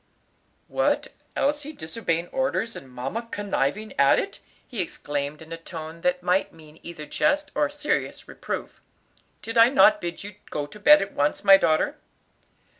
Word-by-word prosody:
"What, - - 0 0.3
Elsie 295 +1 0
disobeying 170 - -2
orders, 265 -4 -1
and 130 - -10
mamma 135 - -4
conniving 205 0 -2
at 140 0 +6
it!" 400 - -3 0.3
he 230 -6 -3
exclaimed 145 -2 -4
in 160 - -16
a 165 - -4
tone 165 -1 -8
that 180 0 0
might 180 +2 +1
mean 155 -1 -16
either 170 -3 -8
jest 295 - 0
or 295 - +1
serious 295 +1 -2
reproof. - - -6 0.6
"Did 225 +1 0
I 230 +1 +8
not 215 -6 +5
bid 170 +1 -5
you 205 -1 -9
go 145 - -3
to 145 +9 -13
bed 200 -1 +7
at 195 - -8
once, 145 +6 0
my 195 -1 +9
daughter?" 155 -4 +1
180 Hz, 160 wpm, -25 LUFS, 155-230 Hz, 0.6 s, my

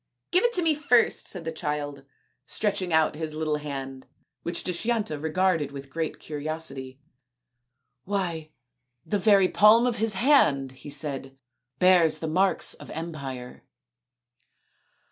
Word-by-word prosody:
" - - -56
Give 365 +2 +4
it 480 0 +2
to 360 - +3
me 320 -2 +3
first/' 250 -5 +2
said 180 -4 -4
the 165 - -2
child, 150 -3 -4 0.4
stretching 195 -4 -1
out 160 -1 +3
his 155 0 -5
little 155 -1 -1
hand, 135 -3 -7 0.3
which 170 0 -3
Dushyanta 205 -3 -1
regarded 160 -1 0
with 140 -1 -9
great 160 +1 -3
curiosity. 145 -3 -5 0.5
" 125 +1 -54
Why 175 -6 -3 0.6
the 205 - -1
very 195 -1 +5
palm 215 +5 +5
of 245 -1 0
his 220 0 0
hand/' 145 - +3
he 130 +3 -12
said, 135 -2 -4 0.2
" - - -57
bears 175 -2 +5
the 160 - -4
marks 185 +5 +2
of - - -12
empire." 140 -7 -7
160 Hz, 145 wpm, -26 LUFS, 140-195 Hz, 0.6 s, very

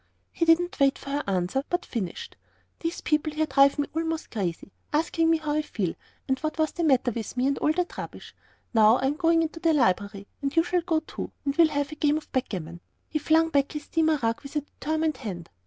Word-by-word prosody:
He 335 - 0
didn't 335 +1 +3
wait 275 -1 +4
for 275 - -8
her 290 +1 0
to - - -6
answer, 185 +8 0
but 355 0 -1
finished, 200 -8 -5 0.4
"These 330 0 -3
people 305 0 0
here 315 +1 +1
drive 275 0 +4
me 290 - 0
almost 325 0 -2
crazy, 195 -3 -3 0.2
asking 325 +1 +1
me 330 - +4
how 310 -1 -3
I 305 - +2
feel, 195 - -3 0.3
and 265 -1 0
what 310 0 -3
was 315 -1 +1
the 345 - -3
matter 260 -5 +3
with 230 +2 -6
me, 250 - +2
and 275 0 +1
all 300 - +3
that 360 +1 -2
rubbish. - - -8 0.4
Now, 220 +1 +6
I'm 270 +2 +1
going 330 +1 +3
into 325 +1 -4
the 330 -1 +3
library, 200 -5 +1 0.2
and 275 +1 -2
you 330 - +5
shall 355 0 0
go 325 -2 0
too, - - -7
and 280 0 0
we'll 335 0 +6
have 285 -1 -2
a - - -6
game 300 0 +2
of 310 - -9
backgammon." 175 - -3 0.3
He 305 - -1
flung 320 +2 +3
back 280 -3 +1
his 300 -1 -5
steamer 320 -1 +2
rug 230 +4 0
with 280 +1 -11
a 295 - +1
determined 310 +1 -2
hand. 180 -8 -7
295 Hz, 230 wpm, -26 LUFS, 250-320 Hz, 0.4 s, Now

